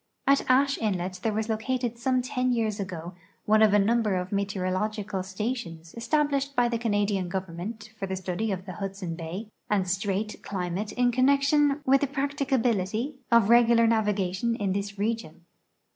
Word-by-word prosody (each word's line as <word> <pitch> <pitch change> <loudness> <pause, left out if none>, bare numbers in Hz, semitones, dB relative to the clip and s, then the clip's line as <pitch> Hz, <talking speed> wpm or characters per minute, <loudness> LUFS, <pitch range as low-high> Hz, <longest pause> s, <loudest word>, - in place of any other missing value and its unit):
At 275 -1 +3
Ashe 275 +2 +3
inlet 185 -4 -2
there 225 - 0
was 215 +1 -2
located 240 +2 -1
some 255 +1 0
ten 255 -1 0
years 220 -3 0
ago 180 -3 -5 0.3
one 215 +1 +4
of 215 -2 +6
a 205 - +5
number 215 0 +2
of 180 +2 -3
meteorological 200 +1 -2
stations 190 -4 -5
established 280 +3 0
by 245 -1 +3
the 235 -1 -1
Canadian 205 -4 0
government 190 +5 -5
for 195 - -3
the 190 - -2
study 190 +4 -2
of 185 -1 -4
the 185 - -6
Hudson 195 -2 -5
bay 175 +6 -6 0.2
and 195 -3 +1
strait 200 +2 -2
climate 185 +2 -3
in 245 0 +2
connection 280 +3 +3
with 270 +1 +4
the 285 - +1
practicability 265 -4 -1
of 235 -3 +5
regular 235 -1 +6
navigation 210 -1 +1
in 200 -4 -1
this 200 0 -4
region. 205 -6 -3
215 Hz, 160 wpm, -27 LUFS, 190-240 Hz, 0.3 s, of